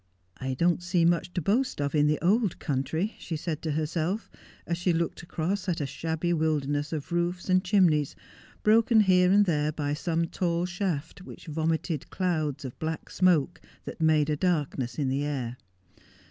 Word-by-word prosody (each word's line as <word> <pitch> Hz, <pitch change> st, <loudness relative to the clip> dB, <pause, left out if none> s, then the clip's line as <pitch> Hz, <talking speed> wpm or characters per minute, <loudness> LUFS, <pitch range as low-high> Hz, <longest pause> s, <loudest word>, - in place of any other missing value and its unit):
' 90 Hz, 0 st, -31 dB
I 130 Hz, -, -1 dB
don't 170 Hz, +4 st, +2 dB
see 175 Hz, -1 st, +1 dB
much 175 Hz, +1 st, +1 dB
to 175 Hz, -, -1 dB
boast 240 Hz, -, +1 dB
of 145 Hz, -1 st, -1 dB
in 150 Hz, -1 st, +4 dB
the 150 Hz, 0 st, +2 dB
old 210 Hz, 0 st, +2 dB
country,' 150 Hz, -, -2 dB
she 165 Hz, -, -5 dB
said 155 Hz, 0 st, -4 dB
to 155 Hz, -2 st, -2 dB
herself, 160 Hz, +6 st, -2 dB, 0.3 s
as 170 Hz, 0 st, -2 dB
she 175 Hz, 0 st, +1 dB
looked 165 Hz, 0 st, -1 dB
across 175 Hz, +4 st, -3 dB
a 165 Hz, -5 st, 0 dB
shabby 160 Hz, +4 st, -2 dB
wilderness 150 Hz, -2 st, 0 dB
of 155 Hz, 0 st, -5 dB
roofs 175 Hz, +2 st, -1 dB
and 185 Hz, 0 st, +4 dB
chimneys, 180 Hz, -7 st, +3 dB, 0.5 s
broken 225 Hz, +1 st, +5 dB
here 180 Hz, -2 st, +4 dB
and 205 Hz, +1 st, +5 dB
there 150 Hz, -4 st, +1 dB
by 145 Hz, -1 st, -2 dB
some 165 Hz, +2 st, 0 dB
tall 170 Hz, 0 st, -1 dB
shaft 180 Hz, -4 st, -3 dB
which -, -, -11 dB
vomited 160 Hz, -1 st, -2 dB
clouds 155 Hz, -7 st, -1 dB
of 130 Hz, -, -8 dB
black 160 Hz, 0 st, -4 dB
smoke 175 Hz, -3 st, +2 dB, 0.2 s
that -, -, -7 dB
made 155 Hz, -1 st, +3 dB
a -, -, +1 dB
darkness 145 Hz, -7 st, -1 dB
in 145 Hz, -3 st, 0 dB
the 135 Hz, +2 st, 0 dB
air. 130 Hz, -5 st, -3 dB
165 Hz, 175 wpm, -27 LUFS, 150-180 Hz, 0.5 s, broken